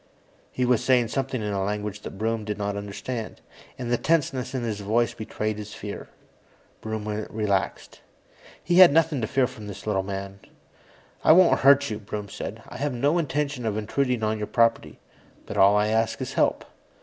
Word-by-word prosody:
He 125 - -1
was 125 -2 +2
saying 125 -3 +3
something 135 -4 -2
in 105 -1 -2
a 100 -1 -1
language 105 0 -3
that - - -8
Broom 110 +1 -1
did 105 -1 -4
not 100 -1 -2
understand, 105 +3 -5 0.4
and 120 -2 -4
the 120 - +2
tenseness 145 -5 0
in 125 - -2
his 110 -3 -3
voice 115 +4 +1
betrayed 110 -1 -4
his 105 0 -8
fear. 105 0 -7 0.7
Broom 110 -1 -4 0.2
relaxed. 105 -3 -2 0.6
He 175 +1 +3
had 185 -4 +10
nothing 155 -3 +2
to 110 - -1
fear 135 +3 +2
from 110 -4 -9
this 100 0 -9
little 105 -3 +1
man. 95 0 -6 0.8
"I - - +7
won't 180 0 +5
hurt 140 -1 +5
you," 105 - -3
Broom 105 -1 -6
said. - - -7
"I - - -9
had 140 -1 -2
no 145 +8 +2
intention 145 -4 -2
of 110 -2 -1
intruding 125 +2 -1
on 110 0 0
your 105 - -3
property, 115 -1 +1 0.5
but - - -7
all 100 +1 +6
I 105 +1 +2
ask 110 +1 0
is - - -4
help." - - +1
110 Hz, 185 wpm, -25 LUFS, 105-130 Hz, 0.8 s, had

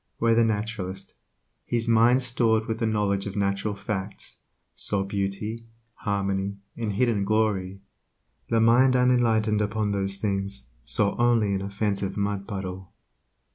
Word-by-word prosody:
Where 115 0 +3
the 115 +1 +4
naturalist, 105 -3 -3 0.5
his 120 -1 -1
mind 115 +3 +4
stored 115 -3 +2
with 110 0 -3
the 115 - +1
knowledge 105 -2 0
of 100 - -6
natural 100 +1 -1
facts, 100 0 -5 0.4
saw 100 -2 0
beauty, 100 +3 -3 0.3
harmony, 100 -2 -2 0.2
and 110 -3 -3
hidden 115 -2 +1
glory, 100 -3 0 0.7
the 115 - +3
mind 125 +3 +5
unenlightened 115 -4 +3
upon 105 0 -1
those 100 -1 0
things 100 - -1
saw 100 - +1
only 115 -4 +3
an 95 - -1
offensive 100 0 -2
mud 100 -1 -2
puddle. 95 -3 -6
105 Hz, 135 wpm, -26 LUFS, 100-115 Hz, 0.7 s, mind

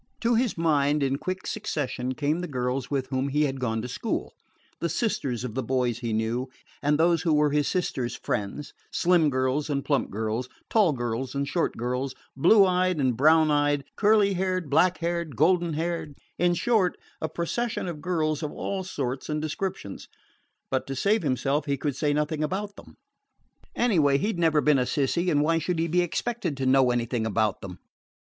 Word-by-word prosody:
To 235 0 +2
his 235 -3 +1
mind, 150 -3 +2
in 135 0 0
quick 185 0 -4
succession, 130 -11 -3
came 150 +4 0
the 180 - -4
girls 125 -2 -2
with 135 -2 -2
whom 130 0 -1
he 150 +2 +2
had 135 -2 -1
gone 115 -3 -1
to - - -4
school - - -3 0.5
the 170 - -1
sisters 140 - -1
of 125 -4 -4
the 130 - -1
boys 125 -1 0
he 120 -2 -3
knew, 115 +4 -1 0.3
and 145 +1 +2
those 170 +1 +3
who 160 -3 +2
were 150 -1 +3
his 145 0 +1
sister's 130 -9 -1
friends: 105 +8 -4 0.2
slim 170 -3 +3
girls 130 +3 0
and 140 -1 -1
plump 140 -2 +1
girls, 110 +4 -3 0.2
tall 210 -7 +4
girls 120 +1 -3
and 140 0 -1
short 170 +2 -1
girls, 125 +3 -2 0.2
blue 195 +9 +6
eyed 185 -2 +1
and 130 -3 +2
brown 155 +4 +5
eyed, 145 -1 +2
curly 210 -2 +4
haired, 185 -4 -1
black 180 +5 +4
haired, 170 -4 -2
golden 170 +4 +2
haired; 160 -2 -3 0.2
in 175 0 +3
short, 195 -1 +1 0.2
a 160 - -2
procession 185 +8 -2
of 160 -4 -5
girls 155 -3 0
of 150 - -3
all 195 -1 -3
sorts 135 -7 -4
and 150 0 -1
descriptions. 155 - -4 0.6
But, 130 -1 -1
to 135 - -4
save 205 - +2
himself, 140 +1 0
he 140 -1 0
could 145 0 -2
say 145 +1 0
nothing 150 +1 0
about 200 +5 -3
them. - - -15 0.8
Anyway, 160 - +3
he 210 +10 -1
'd 170 - -6
never 160 -3 +3
been 150 -2 +4
a 125 - +1
"sissy," 165 +6 0
and 145 -1 +3
why 165 +2 +2
should 175 +2 -2
he 165 +1 0
be 175 +2 +2
expected 180 - -2
to 135 - -2
know 130 -1 +4
anything 120 -1 -1
about 110 -2 0
them? 90 -2 -8
150 Hz, 190 wpm, -26 LUFS, 130-175 Hz, 0.8 s, blue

